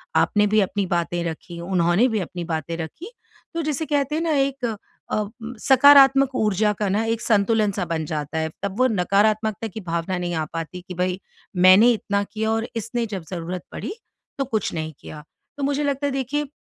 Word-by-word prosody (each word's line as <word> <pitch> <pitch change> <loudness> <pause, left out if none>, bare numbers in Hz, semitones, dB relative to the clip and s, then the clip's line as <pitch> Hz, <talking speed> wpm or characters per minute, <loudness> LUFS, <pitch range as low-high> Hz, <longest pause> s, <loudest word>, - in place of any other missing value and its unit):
आपने 210 0 +3
भी 215 +1 +3
अपनी 195 +1 -1
बातें 175 -1 -1
रखीं, 170 +1 -6
उन्होंने 175 +5 +2
भी 220 -2 0
अपनी 175 -1 -5
बातें 160 0 -3
रखीं, 170 - -7 0.5
तो 335 - -1
जिसे 305 +1 -2
कहते 290 0 0
हैं 320 - 0
ना, 325 - 0
एक 275 -2 0 0.5
अ, 215 - 0 0.3
सकारात्मक 275 0 +6
ऊर्जा 210 -1 +2
का 210 - 0
ना 205 +4 +1
एक 225 0 -1
संतुलन-सा 205 -3 +1
बन 160 -2 -2
जाता 150 +1 -4
है। 160 0 -1
तब 200 0 -3
वो 255 - +5
नकारात्मकता 215 +2 +1
की 220 +1 -8
भावना 170 +1 -2
नहीं 175 -1 -3
आ 160 - 0
पाती 165 +2 -5
कि 180 - -6
भई, 180 +1 -1 0.4
मैंने 185 +6 +7
इतना 200 -2 -1
किया 220 +1 -2
और 225 +1 -1
इसने 230 +2 -2
जब 185 -4 -4
ज़रूरत 175 0 -4
पड़ी, 390 - -5 0.4
तो 275 - 0
कुछ 220 -5 -2
नहीं 155 -1 -4
किया। 150 -1 -10 0.3
तो 280 - -4
मुझे 285 +1 0
लगता 285 0 0
है, - - -1
देखिए, 275 +2 -2
210 Hz, 190 wpm, -23 LUFS, 175-255 Hz, 0.5 s, मैंने